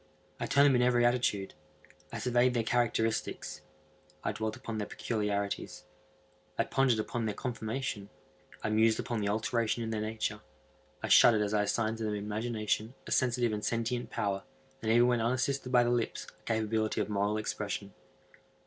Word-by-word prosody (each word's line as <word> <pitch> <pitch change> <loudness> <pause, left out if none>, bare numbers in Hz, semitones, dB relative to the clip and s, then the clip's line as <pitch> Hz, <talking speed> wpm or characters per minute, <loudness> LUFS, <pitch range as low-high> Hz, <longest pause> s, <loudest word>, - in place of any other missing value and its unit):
I - - -2
turned 140 +1 +5
them 140 -2 +5
in 125 - +3
every 120 -1 +4
attitude. 120 -5 +1 0.6
I - - -4
surveyed 125 0 +2
their 115 - +2
characteristics. 115 -1 -1 0.6
I - - 0
dwelt 110 0 -3
upon 110 -1 -5
their 105 - -3
peculiarities. 105 -3 -2 0.7
I - - +3
pondered 130 -4 +2
upon 115 +2 -2
their 105 - -2
conformation. 115 -3 -4 0.5
I 105 - 0
mused 110 +1 +3
upon 120 -2 -2
the 100 - 0
alteration 115 +2 0
in 115 - -3
their 110 -1 -1
nature. 110 0 -3 0.6
I - - -1
shuddered 110 -3 +7
as 105 0 -2
I 105 - +3
assigned 110 +2 0
to - - -3
them 105 -1 -1
in 100 - -4
imagination 110 +1 -2
a - - -8
sensitive 120 -3 +2
and 105 0 -3
sentient 115 +2 -1
power, 100 -1 -1 0.4
and 110 - 0
even 120 +1 +6
when 120 -2 +2
unassisted 130 +2 0
by 125 -1 +6
the 120 - +1
lips, 120 -2 -1
a - - -18
capability 110 -1 0
of - - 0
moral 105 0 0
expression. 105 -2 -4
110 Hz, 175 wpm, -31 LUFS, 105-120 Hz, 0.7 s, shuddered